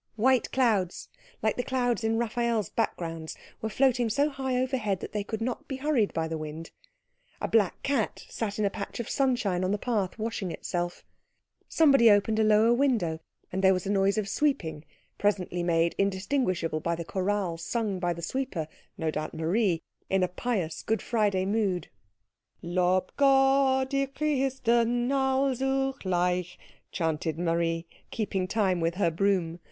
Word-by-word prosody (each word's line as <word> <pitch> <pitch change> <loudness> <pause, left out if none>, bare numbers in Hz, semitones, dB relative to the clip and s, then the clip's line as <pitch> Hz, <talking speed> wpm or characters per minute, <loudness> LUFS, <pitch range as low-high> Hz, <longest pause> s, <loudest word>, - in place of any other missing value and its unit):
White 250 +2 +2
clouds, 215 -9 +1 0.3
like 220 - +1
the 245 - 0
clouds 245 -3 0
in 225 0 +1
Raphael's 235 -3 0
backgrounds, 165 -7 -3 0.2
were 220 - -2
floating 245 0 +2
so 285 +6 +2
high 265 -2 -1
overhead 250 -7 -1
that - - -7
they 210 -1 -2
could 220 +2 -5
not 240 +1 -3
be 270 - -4
hurried 265 -6 +1
by 160 0 -1
the 160 -1 -4
wind; 155 +2 -7 0.7
a - - -2
black 210 -5 +1
cat 270 -6 -1
sat 205 -3 -4
in 215 - +1
a 200 - +1
patch 200 +2 -6
of 235 - -3
sunshine 240 -9 +1
on 185 - 0
the 205 - +1
path 205 -4 -1
washing 220 -4 -3
itself; 175 +2 -4 0.6
somebody 275 -7 +6
opened 210 +1 +3
a - - +4
lower 215 +2 +5
window, 235 - +1 0.3
and 190 +1 -2
there 190 0 +6
was 185 - -3
a 195 - -1
noise 195 +1 +2
of 210 -2 0
sweeping, 170 - -1 0.4
presently 185 -4 0
made 170 -1 +2
indistinguishable 190 - 0
by 170 +2 -1
the 170 0 -6
chorale 190 -1 -1
sung 210 +1 -2
by 175 -1 0
the 170 0 -5
sweeper, 195 - -3 0.3
no 160 -4 -1
doubt 155 +1 -4
Marie, 170 +1 +1 0.3
in 190 -1 +2
a - - +3
pious, 180 -4 -2
Good 220 0 -1
Friday 205 -5 +1
mood. 200 -3 0 0.7
"Lob 180 +1 +1
Gott 270 -1 +4
ihr 275 0 +1
Christen 255 -4 +1
allzugleich," 265 -10 0 0.3
chanted 160 -2 -1
Marie, 165 -1 0 0.2
keeping 195 -4 -2
time 195 -3 +1
with 165 +1 0
her 175 -3 +1
broom. 175 -1 0
205 Hz, 160 wpm, -28 LUFS, 175-245 Hz, 0.7 s, somebody